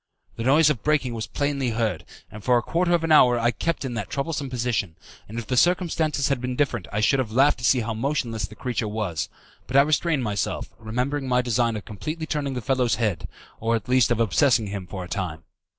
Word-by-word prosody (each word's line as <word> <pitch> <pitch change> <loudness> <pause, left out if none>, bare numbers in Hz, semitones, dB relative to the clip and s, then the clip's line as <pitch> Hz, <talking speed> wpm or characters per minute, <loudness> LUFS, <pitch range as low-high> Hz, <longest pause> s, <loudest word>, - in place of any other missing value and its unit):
The - - -6
noise 150 +5 +5
of 125 -8 -3
breaking 145 -4 +1
was 110 -2 -4
plainly 140 -3 -1
heard, 110 -6 -1 0.3
and 105 -1 -10
for 125 -1 +4
a 120 - 0
quarter 175 +6 0
of 165 - -1
an 165 - 0
hour 125 -5 +6
I 120 +1 +2
kept 165 +2 -2
in 125 - -3
that 115 - -4
troublesome 140 -1 -3
position, 120 -8 -1 0.3
and 110 - -7
if 115 - -4
the 125 - -1
circumstances 160 -2 +2
had 140 -3 0
been 125 0 -3
different 125 -9 -1
I 105 - -1
should 135 +5 +3
have 120 -5 -2
laughed 135 +4 +4
to - - -10
see 125 0 +4
how 115 0 -3
motionless 115 -4 -2
the 105 - -13
creature 120 -3 -2
was; 105 -7 -3 0.4
but 130 - +1
I 140 - +8
restrained 155 -1 +1
myself, 105 -3 -2
remembering 125 +5 -2
my 125 0 +2
design 120 -1 +1
of 105 - -6
completely 155 - -5
turning 145 -4 -2
the 125 - -3
fellow's 125 0 +1
head, 105 -7 -1 0.3
or 115 +1 +1
at 110 - -4
least 125 -2 +4
of 120 -2 +1
obsessing 115 +1 +3
him 100 -2 -5
for 95 +1 -6
a - - -8
time. 85 -4 -4
125 Hz, 230 wpm, -24 LUFS, 110-140 Hz, 0.4 s, I